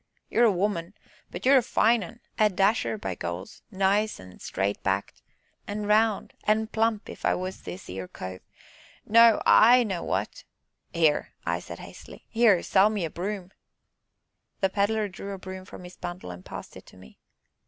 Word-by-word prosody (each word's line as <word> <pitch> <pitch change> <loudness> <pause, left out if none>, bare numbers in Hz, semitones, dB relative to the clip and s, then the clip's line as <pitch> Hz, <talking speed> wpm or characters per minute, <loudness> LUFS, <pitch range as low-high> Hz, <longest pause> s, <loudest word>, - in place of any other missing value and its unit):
You're 240 - +4
a 225 - +5
woman, 190 -1 -2 0.3
but - - -7
you're 270 +1 +7
a - - 0
fine 230 0 +2
un 230 +7 -11 0.2
a 215 -1 +5
dasher, 200 +3 +1
by 95 - -4
Goles, 85 +1 -6
nice 200 +1 +1
an' 90 0 -13
straight 100 +1 -2
backed, 95 0 -2 0.5
an' 205 +1 -3
round, 215 0 +2
an' 215 +1 +2
plump 220 -1 0
if - - -10
I - - +2
was 185 +1 -5
this 185 - -8
'ere 90 0 -6
cove, 95 0 -8 0.6
now, 230 0 +6
I 245 +3 +7
know 190 -6 -3
what - - -3 0.2
" - - -51
"Here," 160 -3 +1 0.2
said - - -9
I - - -10
hastily, - - -12
"here 225 -6 +4
sell 195 +2 +4
me 205 -5 -2
a 160 - -5
broom!" 190 0 -5 1.1
The 190 -1 +2
Pedler 210 +2 +1
drew 200 +1 -7
a - - -6
broom 185 0 -8
from 180 - -11
his 180 0 -12
bundle 175 - -6
and 90 +1 -10
passed - - -9
it - - -13
to - - -16
me. 90 -8 -16
195 Hz, 180 wpm, -27 LUFS, 170-215 Hz, 1.1 s, you're